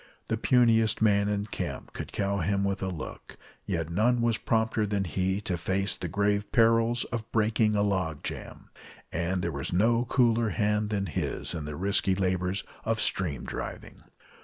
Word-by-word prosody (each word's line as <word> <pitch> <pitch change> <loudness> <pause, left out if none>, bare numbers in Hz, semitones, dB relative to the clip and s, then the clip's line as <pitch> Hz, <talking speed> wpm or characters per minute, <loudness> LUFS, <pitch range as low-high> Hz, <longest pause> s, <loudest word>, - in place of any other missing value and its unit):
The 115 - +2
puniest 115 -2 +3
man 100 -2 +3
in 105 0 -1
camp 105 - -5
could - - -6
cow 100 0 -1
him 100 +3 0
with 100 0 -1
a 95 - -1
look, 90 -5 -7 0.3
yet 85 -3 -2
none 120 +7 +2
was 115 -1 +2
prompter 110 -1 +1
than 100 -1 0
he 95 +3 -1
to 90 -4 -2
face 95 +4 0
the - - -5
grave 100 0 0
perils 115 0 +3
of 115 -2 -4
breaking 110 -1 +2
a 100 - +2
log 95 -7 -1
jam, - - -7 0.4
and 90 +2 -1
there 85 - -1
was 70 -2 -3
no 115 +6 +3
cooler 120 -3 +2
hand 105 0 0
than 100 -2 -1
his 80 - -3
in 80 -3 -4
the 75 0 -5
risky 95 +2 +2
labors 95 0 0 0.2
of 115 0 0
stream 80 -8 +1
driving. - - -7
100 Hz, 175 wpm, -28 LUFS, 95-110 Hz, 0.4 s, puniest